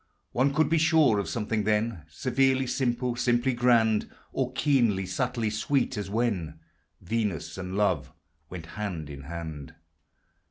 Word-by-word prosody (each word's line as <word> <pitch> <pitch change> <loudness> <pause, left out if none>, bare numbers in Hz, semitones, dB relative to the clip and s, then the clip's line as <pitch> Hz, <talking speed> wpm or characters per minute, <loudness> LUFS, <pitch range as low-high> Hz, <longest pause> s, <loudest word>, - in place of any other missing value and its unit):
One 130 +3 +2
could 155 +1 +2
be 165 +2 +2
sure 155 -9 +4
of 100 - -3
something 110 -2 -1
then 105 -5 0
Severely 130 +7 +1
simple, 125 -1 -1
simply 120 +1 +1
grand, 115 -3 +3 0.2
Or 130 -1 -1
keenly, 120 -10 +2
subtly 115 +4 -1
sweet, 130 +4 0
as 105 -3 -4
when 100 -8 -1 0.4
Venus 90 -6 -2
and 95 0 -5
Love 105 0 +1 0.4
went 90 -3 -7
hand 85 -5 -5
in 70 -1 -8
hand. 80 -2 -7
110 Hz, 135 wpm, -27 LUFS, 95-125 Hz, 0.4 s, sure